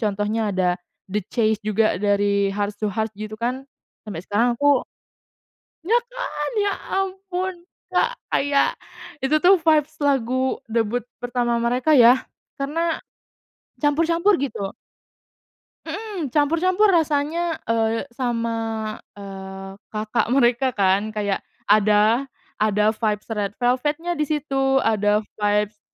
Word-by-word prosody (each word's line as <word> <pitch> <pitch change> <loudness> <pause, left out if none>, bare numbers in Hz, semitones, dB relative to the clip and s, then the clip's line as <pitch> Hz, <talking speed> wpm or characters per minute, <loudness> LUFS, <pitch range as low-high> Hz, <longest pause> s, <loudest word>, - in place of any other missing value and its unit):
contohnya 210 0 -1
ada 180 -1 +1 0.3
The 210 +2 -1
Chase 220 -3 +1
juga 215 +1 +2
dari 200 0 +2
Heart 205 0 -2
to - - +2
Heart 220 +1 -2
gitu 215 +1 -6
kan 255 +3 -2 0.4
sampai 200 -6 -6
sekarang 235 +3 +1
aku 285 -3 +4 1.0
iya 460 +5 +4
kan! 485 -11 -4
Ya 405 -1 +1 0.2
ampun, 380 -1 -2 0.4
Kak! - - +1 0.2
Kayak 280 0 +3 0.5
itu 270 +3 +2
tuh 365 +4 +6
vibes 310 -1 +3
lagu 260 -2 +1
debut 230 +1 0 0.2
pertama 245 -1 0
mereka 250 +6 +2
ya, 250 0 +6 0.3
karena 325 +4 -1 0.8
campur-campur 330 +6 +3
gitu. 215 -8 -3 1.1
Mhm, 410 -9 -4
campur-campur 335 - +3
rasanya, 320 +1 +1
eee, 225 +1 0
sama, 235 -2 -1 0.6
eee, 195 -1 -8 0.2
kakak 215 +2 -1
mereka 250 0 +3
kan 200 +2 +2
kayak 205 -2 -2 0.2
ada 215 +5 +4 0.3
ada 210 0 +3
vibes 215 -2 -1
Red 205 -1 -2
Velvet 255 +5 +1
nya 350 - 0
disitu 280 -3 0
ada 210 -1 +2 0.2
vibes, 210 0 +1
240 Hz, 115 wpm, -22 LUFS, 210-295 Hz, 1.1 s, tuh